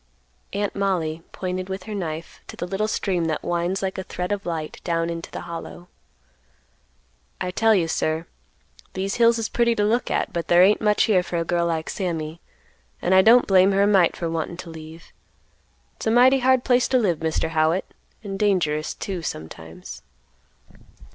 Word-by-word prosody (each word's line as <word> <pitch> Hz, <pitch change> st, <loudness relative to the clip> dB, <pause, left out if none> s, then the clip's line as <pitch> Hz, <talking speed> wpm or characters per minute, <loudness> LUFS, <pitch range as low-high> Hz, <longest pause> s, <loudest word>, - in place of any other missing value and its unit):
Aunt 205 Hz, 0 st, -2 dB
Mollie 170 Hz, -5 st, -1 dB
pointed 185 Hz, 0 st, -4 dB
with 190 Hz, 0 st, -5 dB
her 215 Hz, -, -7 dB
knife 165 Hz, -4 st, -5 dB
to -, -, -9 dB
the -, -, -3 dB
little 195 Hz, +4 st, -1 dB
stream 185 Hz, -5 st, -1 dB
that 160 Hz, -1 st, -2 dB
winds 175 Hz, +3 st, -1 dB
like 190 Hz, 0 st, -2 dB
a -, -, -4 dB
thread 180 Hz, 0 st, -5 dB
of 200 Hz, -2 st, -3 dB
light 160 Hz, -3 st, -4 dB
down 170 Hz, -1 st, -1 dB
into 165 Hz, 0 st, -6 dB
the -, -, -7 dB
Hollow. 170 Hz, +1 st, -8 dB, 1.5 s
"I 180 Hz, -1 st, -2 dB
tell 225 Hz, +3 st, +3 dB
you, 170 Hz, -4 st, +1 dB
sir, 160 Hz, 0 st, -1 dB, 0.7 s
these 195 Hz, +1 st, -2 dB
hills 235 Hz, 0 st, +5 dB
is 225 Hz, -1 st, -2 dB
pretty 235 Hz, -1 st, +1 dB
to 210 Hz, -, +1 dB
look 230 Hz, +4 st, +1 dB
at, -, -, -1 dB
but 170 Hz, -1 st, -3 dB
there 175 Hz, +1 st, +6 dB
ain't 205 Hz, +3 st, +4 dB
much 210 Hz, -1 st, +3 dB
here 195 Hz, -5 st, +3 dB
for 175 Hz, -1 st, -4 dB
a 165 Hz, -, -1 dB
girl 170 Hz, 0 st, 0 dB
like 160 Hz, -1 st, -2 dB
Sammy, 165 Hz, -4 st, -4 dB, 0.6 s
and 180 Hz, -, +1 dB
I 190 Hz, -, +7 dB
don't 235 Hz, +5 st, +6 dB
blame 190 Hz, 0 st, +4 dB
her 195 Hz, +1 st, +3 dB
a -, -, +4 dB
mite 190 Hz, -5 st, +4 dB
for 170 Hz, -, -3 dB
wantin' 165 Hz, +1 st, -3 dB
to 170 Hz, -, -10 dB
leave. 160 Hz, +1 st, -12 dB, 0.8 s
It's -, -, -5 dB
a -, -, +4 dB
mighty 255 Hz, +4 st, +5 dB
hard 260 Hz, 0 st, +3 dB
place 245 Hz, -2 st, +3 dB
to 260 Hz, -, +2 dB
live, 190 Hz, -9 st, +1 dB
Mr. 160 Hz, 0 st, -1 dB
Howitt, 160 Hz, +3 st, +1 dB, 0.4 s
and 195 Hz, -2 st, -5 dB
dangerous, 170 Hz, -7 st, +1 dB
too, 190 Hz, -3 st, -4 dB
sometimes." 80 Hz, -, -8 dB
180 Hz, 185 wpm, -23 LUFS, 165-205 Hz, 1.5 s, I